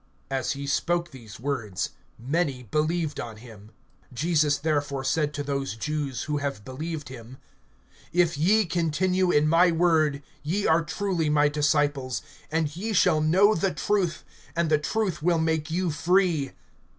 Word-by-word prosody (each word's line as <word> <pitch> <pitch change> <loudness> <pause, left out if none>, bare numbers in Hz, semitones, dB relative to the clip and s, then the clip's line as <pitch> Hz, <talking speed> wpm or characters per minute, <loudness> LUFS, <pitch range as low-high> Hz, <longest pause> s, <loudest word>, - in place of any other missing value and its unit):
(30)As 135 0 0
he 140 0 -6
spoke 170 +4 0
these 115 -6 -11
words 115 -9 -3 0.3
many 135 0 -1
believed 155 - -1
on 115 -2 -6
him. 110 -3 -13 0.5
(31)Jesus 150 -1 +2
therefore 145 -3 -1
said 150 +3 +1
to 145 0 -4
those 140 -3 -2
Jews 140 0 -3
who 150 -1 -2
have 140 -7 -4
believed 150 +3 -5
him: 125 0 -10 0.7
If 170 -1 +2
ye 200 +9 +3
continue 180 +3 +1
in 150 -3 +3
my 170 +3 +5
word, 160 -4 +2 0.2
ye 180 +8 -1
are 160 +1 +4
truly 170 -1 -1
my 150 0 +4
disciples; 145 -3 0 0.3
(32)and 160 -2 0
ye 215 +5 -3
shall 155 -5 +4
know 190 +7 +5
the 190 0 0
truth, 195 -5 0 0.3
and 170 -1 0
the 155 - +4
truth 190 +2 -1
will 170 +1 +2
make 160 -1 0
you 175 +1 0
free. 170 -3 +1
155 Hz, 150 wpm, -26 LUFS, 140-170 Hz, 0.7 s, my